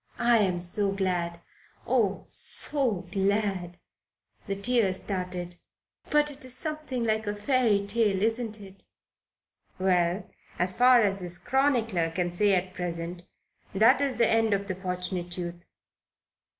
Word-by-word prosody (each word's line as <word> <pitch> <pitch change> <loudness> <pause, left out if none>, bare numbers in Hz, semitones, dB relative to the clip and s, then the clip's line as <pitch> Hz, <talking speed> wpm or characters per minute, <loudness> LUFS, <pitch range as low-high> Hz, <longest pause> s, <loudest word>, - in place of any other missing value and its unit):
"I 235 -1 +3
am 185 -4 0
so 195 +3 +3
glad. 175 -3 -2 0.4
Oh, 220 -6 0
so 230 -11 +1
glad." 195 -3 -1 0.7
The 195 - -2
tears 200 -2 +2
started. 180 -2 -5 0.5
"But 295 0 +2
it 285 +1 -11
is 255 0 +4
something 305 -5 -1
like 220 -1 -1
a 205 - -2
fairy 210 -2 +1
tale, 205 -2 0
isn't 225 -1 -1
it?" 195 -1 -14 0.9
Well, 180 0 +1 0.3
as 180 +1 0
far 245 +1 +5
as 195 -1 0
his 175 -1 -4
chronicler 235 -11 0
can 175 +1 -2
say 200 +2 +2
at 185 0 -2
present, 175 0 -6 0.5
that 220 +6 +5
is 275 -4 -1
the 235 -1 +3
end 225 -2 +2
of 200 0 -5
the 190 - -2
Fortunate 180 -1 -4
Youth. 175 -1 -7
200 Hz, 135 wpm, -27 LUFS, 180-230 Hz, 0.9 s, far